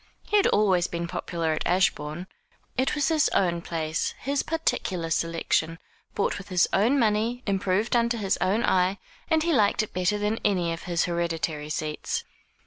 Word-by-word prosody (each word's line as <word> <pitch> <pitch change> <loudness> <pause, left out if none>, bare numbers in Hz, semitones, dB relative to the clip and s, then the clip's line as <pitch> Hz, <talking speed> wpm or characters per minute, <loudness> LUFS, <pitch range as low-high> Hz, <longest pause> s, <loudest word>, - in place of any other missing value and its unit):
He - - -2
had 405 - +5
always 190 -4 +3
been 170 0 -4
popular 170 -2 -2
at 155 - -2
Ashbourne. 175 -2 0 0.5
It 260 +3 +1
was 285 -2 +1
his 315 -1 +3
own 170 -3 +2
place, 160 -1 -2
his 280 +1 -1
particular 185 - -2
selection, 165 0 0 0.4
bought 200 - 0
with 195 - -11
his 180 -2 +3
own 235 +8 +3
money, 230 +1 +1
improved 200 +3 0
under 235 0 +2
his 200 -3 0
own 195 +5 +2
eye, 185 +1 +2 0.3
and 320 -1 +3
he 340 0 +1
liked 215 -4 +3
it 215 - -9
better 185 +3 +1
than 210 +2 -1
any 180 -5 +1
of 165 - -8
his 170 -1 +1
hereditary 165 -3 -2
seats. 155 0 -3
185 Hz, 170 wpm, -26 LUFS, 170-225 Hz, 0.5 s, had